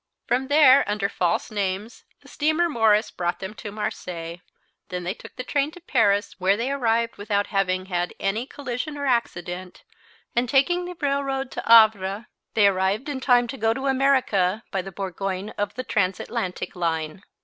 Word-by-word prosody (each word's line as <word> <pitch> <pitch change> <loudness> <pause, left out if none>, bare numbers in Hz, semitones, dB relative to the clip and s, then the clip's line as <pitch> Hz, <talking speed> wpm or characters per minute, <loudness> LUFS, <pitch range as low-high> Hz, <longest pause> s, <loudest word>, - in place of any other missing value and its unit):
From 260 +2 0
there 285 -2 +6
under 210 -1 0
false 175 0 -1
names 205 +2 -3 0.2
the - - -18
steamer 315 +3 +1
Morris 225 -7 +2
brought 175 0 -2
them 190 +2 -6
to 215 -2 -8
Marseilles; 175 -5 -5 0.5
then 180 -1 -4
they 180 +2 -2
took - - -13
the 250 - -5
train 285 +2 0
to - - -11
Paris, 215 - +1
where 190 +2 +3
they 245 +4 -1
arrived 230 -4 0
without 205 0 0
having 185 -1 +1
had 180 -2 -2
any 220 +6 -1
collision 285 +2 -5
or 285 - -3
accident, 180 -7 -2 0.5
and 240 0 +1
taking 350 +7 +2
the 355 -1 -7
railroad 275 -1 -1
to - - -4
Havre 215 -2 +5 0.3
they 210 - +5
arrived 195 +7 +1
in 280 -2 -3
time 245 -2 +4
to 270 - -5
go 225 -1 +1
to 265 - -4
America 260 -8 +2
by 190 - -1
the 195 +1 -9
Bourgogne 195 +1 -4
of 205 -1 -3
the 255 - -4
Transatlantic 195 -1 -2
line. 165 -1 -2
215 Hz, 170 wpm, -24 LUFS, 190-265 Hz, 0.5 s, there